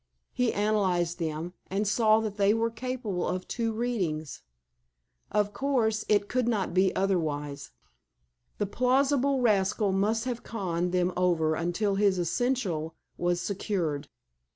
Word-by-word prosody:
He 250 Hz, -2 st, +1 dB
analyzed 185 Hz, -5 st, +1 dB
them, 160 Hz, +1 st, -3 dB, 0.2 s
and 200 Hz, +2 st, -1 dB
saw 215 Hz, +1 st, +4 dB
that 215 Hz, -2 st, -4 dB
they 200 Hz, +1 st, +4 dB
were 230 Hz, 0 st, 0 dB
capable 230 Hz, -5 st, -3 dB
of 185 Hz, 0 st, -3 dB
two 230 Hz, -2 st, -1 dB
readings. 190 Hz, -, -2 dB, 0.9 s
Of 205 Hz, -1 st, +1 dB
course, 230 Hz, -6 st, 0 dB
it 205 Hz, -1 st, +3 dB
could 250 Hz, +1 st, 0 dB
not 210 Hz, -7 st, 0 dB
be 185 Hz, +1 st, +4 dB
otherwise. 150 Hz, -7 st, -1 dB, 0.9 s
The 205 Hz, -, 0 dB
plausible 265 Hz, +4 st, +2 dB
rascal 205 Hz, -2 st, +2 dB
must 215 Hz, +4 st, +1 dB
have 245 Hz, -2 st, -3 dB
conned 180 Hz, -5 st, -2 dB
them 180 Hz, 0 st, +1 dB
over 170 Hz, -3 st, +2 dB
until 175 Hz, +5 st, 0 dB
this 200 Hz, -2 st, +3 dB
essential 175 Hz, -4 st, -1 dB, 0.2 s
was 175 Hz, 0 st, +1 dB
secured. 175 Hz, -7 st, -2 dB
200 Hz, 130 wpm, -28 LUFS, 175-225 Hz, 0.9 s, saw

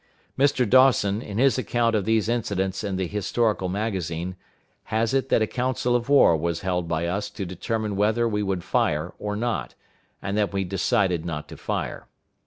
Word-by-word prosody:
Mr. 135 Hz, -3 st, +2 dB
Dawson, 115 Hz, -4 st, +4 dB
in 105 Hz, -3 st, -6 dB
his 130 Hz, +1 st, +3 dB
account 120 Hz, -2 st, +1 dB
of 100 Hz, -3 st, 0 dB
these 110 Hz, -1 st, +2 dB
incidents 100 Hz, -5 st, -1 dB
in 100 Hz, -2 st, -2 dB
the 95 Hz, 0 st, -1 dB
Historical 105 Hz, 0 st, 0 dB
Magazine, 90 Hz, -4 st, -3 dB, 0.5 s
has 110 Hz, +2 st, 0 dB
it 135 Hz, 0 st, +1 dB
that 110 Hz, -, +3 dB
a -, -, +3 dB
council 125 Hz, +1 st, -1 dB
of 120 Hz, +2 st, -1 dB
war 140 Hz, -12 st, +6 dB
was 85 Hz, +1 st, -2 dB
held 90 Hz, -2 st, -1 dB
by 85 Hz, 0 st, -1 dB
us 95 Hz, +4 st, -2 dB
to 100 Hz, -, -5 dB
determine 105 Hz, +4 st, -3 dB
whether 110 Hz, +4 st, +2 dB
we 105 Hz, -2 st, -1 dB
would 95 Hz, -3 st, -2 dB
fire 75 Hz, +4 st, 0 dB
or 105 Hz, 0 st, -3 dB
not, 105 Hz, -, -2 dB, 0.4 s
and 95 Hz, +2 st, -3 dB
that 105 Hz, -1 st, 0 dB
we 100 Hz, 0 st, 0 dB
decided 95 Hz, -2 st, +1 dB
not 75 Hz, -3 st, -5 dB
to -, -, -8 dB
fire. -, -, -4 dB
105 Hz, 185 wpm, -25 LUFS, 90-115 Hz, 0.5 s, war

